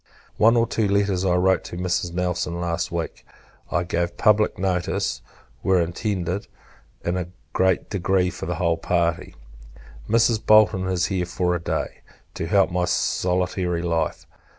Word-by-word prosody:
One 115 Hz, +2 st, +5 dB
or 115 Hz, -, +4 dB
two 110 Hz, -2 st, 0 dB
letters 100 Hz, -2 st, +1 dB
I 90 Hz, -2 st, +2 dB
wrote 95 Hz, +1 st, +2 dB
to 85 Hz, -, -7 dB
Mrs. 90 Hz, -1 st, -1 dB
Nelson 90 Hz, -1 st, -2 dB
last 85 Hz, -1 st, -2 dB
week, 85 Hz, -1 st, -4 dB, 0.5 s
I 85 Hz, -, 0 dB
gave 85 Hz, 0 st, -2 dB
public 105 Hz, -1 st, +3 dB
notice, 90 Hz, -9 st, -1 dB, 0.4 s
were 95 Hz, -1 st, +3 dB
intended, 90 Hz, +2 st, -2 dB, 0.6 s
in 85 Hz, +1 st, 0 dB
a 90 Hz, -2 st, -3 dB, 0.3 s
great 95 Hz, 0 st, +2 dB
degree, 95 Hz, -2 st, +1 dB
for 90 Hz, -, -7 dB
the 90 Hz, -, -2 dB
whole 85 Hz, -1 st, +1 dB
party. 85 Hz, +1 st, -1 dB, 0.7 s
Mrs. 115 Hz, 0 st, +3 dB
Bolton 100 Hz, -3 st, +5 dB
is 90 Hz, -2 st, +1 dB
here 90 Hz, -2 st, -1 dB
for 90 Hz, 0 st, 0 dB
a 90 Hz, -, -1 dB
day, -, -, -3 dB, 0.3 s
to 80 Hz, -, -4 dB
help 95 Hz, +1 st, +3 dB
my 90 Hz, 0 st, +1 dB
solitary 90 Hz, -1 st, 0 dB
life. 85 Hz, -2 st, -1 dB
90 Hz, 150 wpm, -23 LUFS, 85-95 Hz, 0.7 s, One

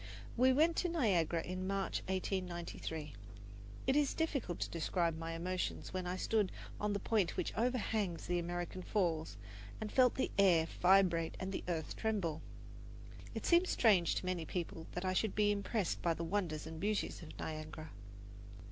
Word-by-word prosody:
We 255 Hz, +2 st, +5 dB
went 320 Hz, +5 st, +4 dB
to 360 Hz, -, +1 dB
Niagara 185 Hz, -, +2 dB
in 185 Hz, +1 st, -4 dB
March, 195 Hz, 0 st, -1 dB
1893. 175 Hz, -5 st, -3 dB, 0.7 s
It 265 Hz, -, +3 dB
is 290 Hz, -2 st, +2 dB
difficult 275 Hz, -, -1 dB
to -, -, -1 dB
describe 170 Hz, 0 st, 0 dB
my 165 Hz, +1 st, -4 dB
emotions 180 Hz, +4 st, -3 dB
when 185 Hz, -1 st, -2 dB
I 180 Hz, -, -1 dB
stood 205 Hz, +1 st, +1 dB, 0.3 s
on 210 Hz, 0 st, 0 dB
the 200 Hz, -, -1 dB
point 205 Hz, -4 st, +1 dB
which -, -, -1 dB
overhangs 220 Hz, -7 st, 0 dB
the 175 Hz, 0 st, 0 dB
American 175 Hz, +1 st, -3 dB
Falls 165 Hz, -, 0 dB, 0.4 s
and 215 Hz, -1 st, -4 dB
felt 255 Hz, -2 st, +5 dB
the 265 Hz, -, 0 dB
air 175 Hz, -5 st, +6 dB, 0.2 s
vibrate 180 Hz, -3 st, +4 dB
and 190 Hz, +1 st, -3 dB
the -, -, -3 dB
earth 160 Hz, -4 st, -2 dB
tremble. 190 Hz, -8 st, -1 dB, 0.9 s
It -, -, -4 dB
seems 345 Hz, +1 st, +5 dB
strange 195 Hz, -8 st, +4 dB
to -, -, -2 dB
many 185 Hz, -2 st, -1 dB
people 165 Hz, -1 st, -4 dB
that 180 Hz, +1 st, -3 dB
I 185 Hz, -, +1 dB
should 205 Hz, +2 st, 0 dB
be 205 Hz, 0 st, +4 dB
impressed 205 Hz, -1 st, -1 dB
by 170 Hz, -1 st, +2 dB
the 170 Hz, -, -4 dB
wonders 170 Hz, -4 st, -1 dB
and 160 Hz, 0 st, -7 dB
beauties 210 Hz, 0 st, -1 dB
of 160 Hz, -, -10 dB
Niagara. 155 Hz, 0 st, -6 dB
185 Hz, 165 wpm, -36 LUFS, 165-210 Hz, 0.9 s, air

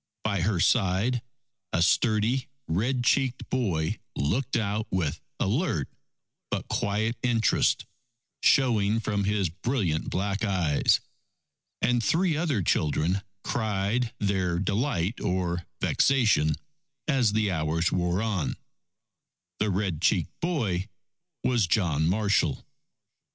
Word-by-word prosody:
By 100 Hz, -4 st, 0 dB
her 95 Hz, 0 st, +1 dB
side 110 Hz, +5 st, +2 dB, 0.5 s
a 85 Hz, -, +2 dB
sturdy 110 Hz, +6 st, +2 dB, 0.2 s
red 120 Hz, +9 st, 0 dB
cheeked 130 Hz, 0 st, +1 dB
boy 95 Hz, -12 st, 0 dB, 0.2 s
looked 120 Hz, -, 0 dB
out 105 Hz, 0 st, -1 dB
with 85 Hz, -6 st, -1 dB, 0.2 s
alert 100 Hz, -, 0 dB, 0.6 s
but -, -, -3 dB
quiet 110 Hz, +3 st, 0 dB
interest 115 Hz, -4 st, +2 dB, 0.6 s
showing 110 Hz, -5 st, +3 dB
from 105 Hz, -2 st, -1 dB
his 100 Hz, -3 st, +1 dB
brilliant 95 Hz, -, -1 dB
black 100 Hz, +2 st, -1 dB
eyes. 90 Hz, -8 st, +2 dB, 0.8 s
And 120 Hz, 0 st, +2 dB
three 165 Hz, -, +2 dB
other 150 Hz, -, 0 dB
children 80 Hz, +4 st, +1 dB, 0.2 s
cried 110 Hz, +2 st, -1 dB
their 95 Hz, -4 st, 0 dB
delight 100 Hz, +1 st, -1 dB
or 90 Hz, -2 st, -1 dB
vexation 105 Hz, -, +3 dB, 0.5 s
as 130 Hz, -8 st, +2 dB
the 105 Hz, -2 st, +1 dB
hours 80 Hz, 0 st, 0 dB
wore 90 Hz, +3 st, 0 dB
on. 105 Hz, -8 st, -1 dB, 1.0 s
The 105 Hz, -, +1 dB
red 95 Hz, -4 st, -1 dB
cheeked 90 Hz, -3 st, +1 dB
boy 110 Hz, -, -1 dB, 0.5 s
was 120 Hz, -7 st, +2 dB
John 80 Hz, -5 st, +2 dB
Marshall. 100 Hz, +1 st, +1 dB
100 Hz, 110 wpm, -27 LUFS, 90-120 Hz, 1.0 s, showing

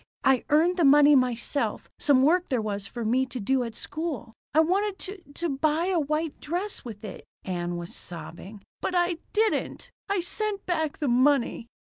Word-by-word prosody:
I 265 Hz, -2 st, +3 dB
earned 330 Hz, +5 st, +3 dB
the 345 Hz, -, +2 dB
money 290 Hz, +1 st, +7 dB
myself 255 Hz, +2 st, 0 dB
some 275 Hz, -3 st, +4 dB
work 350 Hz, +5 st, +3 dB
there 255 Hz, -, +1 dB
was 205 Hz, -2 st, -3 dB
for 235 Hz, -2 st, -5 dB
me 255 Hz, +4 st, +2 dB
to 255 Hz, -, -6 dB
do 260 Hz, +5 st, +1 dB
at 230 Hz, -2 st, -6 dB
school. 295 Hz, -7 st, -5 dB, 0.2 s
I 305 Hz, -, +3 dB
wanted 385 Hz, +5 st, +2 dB
to 385 Hz, 0 st, -5 dB
to 340 Hz, -, -1 dB
buy 310 Hz, +6 st, +1 dB
a 345 Hz, -, +2 dB
white 305 Hz, +1 st, -2 dB
dress 360 Hz, +7 st, -3 dB
with 220 Hz, -3 st, -8 dB
it." 200 Hz, -, -8 dB, 0.2 s
Ann 175 Hz, -2 st, -3 dB
was 170 Hz, 0 st, -7 dB
sobbing. 185 Hz, +4 st, -9 dB, 0.2 s
"But 365 Hz, -, -2 dB
I 350 Hz, -1 st, +1 dB
didn't. 435 Hz, 0 st, 0 dB, 0.2 s
I 400 Hz, -1 st, +1 dB
sent 410 Hz, +3 st, -2 dB
back 315 Hz, -4 st, -1 dB
the 295 Hz, -, -2 dB
money." 250 Hz, -1 st, +2 dB
290 Hz, 180 wpm, -26 LUFS, 235-345 Hz, 0.2 s, money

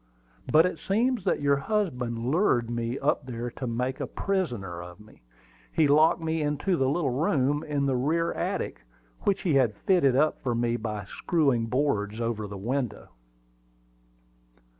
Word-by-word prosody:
"But 160 Hz, +2 st, +6 dB
it 180 Hz, -, -2 dB
seems 230 Hz, +1 st, 0 dB
that -, -, 0 dB
your 140 Hz, 0 st, +3 dB
husband 130 Hz, -, -1 dB
lured 125 Hz, -, +2 dB
me 120 Hz, +1 st, -2 dB
up 145 Hz, -1 st, 0 dB
there 120 Hz, -1 st, -4 dB
to 130 Hz, -, -5 dB
make 125 Hz, +3 st, -2 dB
a -, -, -3 dB
prisoner 120 Hz, -, -2 dB
of 90 Hz, +2 st, -11 dB
me. 105 Hz, +1 st, -18 dB, 0.5 s
He 155 Hz, -, +3 dB
locked 155 Hz, +4 st, +5 dB
me 160 Hz, 0 st, -1 dB
into 150 Hz, +5 st, 0 dB
the 135 Hz, -5 st, +1 dB
little 145 Hz, -2 st, 0 dB
room 145 Hz, +1 st, +1 dB
in 145 Hz, -2 st, -1 dB
the 135 Hz, -2 st, +1 dB
rear 160 Hz, +7 st, 0 dB
attic, -, -, -3 dB, 0.4 s
which 200 Hz, -, +1 dB
he 170 Hz, -, +1 dB
had 125 Hz, -6 st, +3 dB
fitted 155 Hz, -9 st, +4 dB
up 150 Hz, +3 st, +2 dB
for 120 Hz, -3 st, -1 dB
me 120 Hz, 0 st, 0 dB
by 105 Hz, -3 st, -4 dB
screwing 135 Hz, -, 0 dB
boards 110 Hz, -5 st, 0 dB
over 115 Hz, -3 st, -2 dB
the 100 Hz, 0 st, -7 dB
window." 120 Hz, +1 st, -3 dB
135 Hz, 160 wpm, -27 LUFS, 115-155 Hz, 0.5 s, But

